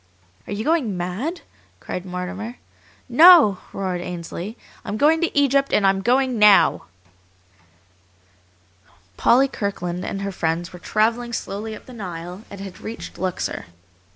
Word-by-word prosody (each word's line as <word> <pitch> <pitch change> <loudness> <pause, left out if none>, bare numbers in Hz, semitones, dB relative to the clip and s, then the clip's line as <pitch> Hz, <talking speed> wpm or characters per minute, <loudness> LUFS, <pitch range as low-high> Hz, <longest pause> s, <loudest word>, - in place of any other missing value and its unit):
"Are - - -4
you 210 +2 -3
going 265 - 0
mad?" 210 - -3 0.4
cried 180 +1 -6
Mortimer. 190 +6 -5 0.5
"No!" 285 - +7
roared 185 -2 -3
Ainsley. 175 +5 -6 0.3
"I'm 210 0 -4
going 315 +6 +3
to 340 - -1
Egypt, 275 -1 +3
and 205 - +3
I'm 195 0 +3
going 255 +1 +1
NOW!" 210 -1 +5 2.3
Polly 260 - +4
Kirkland 180 -7 -4
and 195 0 -4
her 200 - -3
friends 170 0 -2
were 180 - -10
travelling 230 +5 0
slowly 215 +1 -4
up - - -13
the 255 - -12
Nile, 180 -3 -7
and 200 - -10
had 195 -2 -9
reached 225 +1 -8
Luxor. 185 - -3
205 Hz, 135 wpm, -22 LUFS, 180-245 Hz, 2.3 s, No